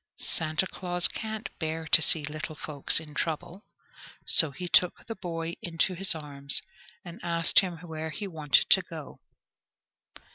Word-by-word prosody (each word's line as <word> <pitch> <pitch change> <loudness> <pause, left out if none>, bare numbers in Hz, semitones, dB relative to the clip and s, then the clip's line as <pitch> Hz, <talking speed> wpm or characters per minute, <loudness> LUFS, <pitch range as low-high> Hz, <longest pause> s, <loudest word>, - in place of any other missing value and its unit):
Santa 155 +3 0
Claus 180 -1 +1
can't 220 0 -6
bear 160 0 -3
to 160 +1 +6
see 160 0 +4
little 155 +1 -6
folks 145 -1 0
in 155 -2 -12
trouble, 170 +6 -4 0.6
so 160 - +5
he 180 +6 -7
took 180 0 +3
the 225 - -5
boy 170 -4 -5
into 170 +2 -1
his 185 0 0
arms, 140 -2 +1 0.5
and 175 0 -10
asked 170 -1 +4
him 180 -4 -2
where 160 0 -5
he 160 +7 -6
wanted 155 -6 +2
to - - +7
go. - - -10
165 Hz, 150 wpm, -28 LUFS, 155-180 Hz, 0.6 s, to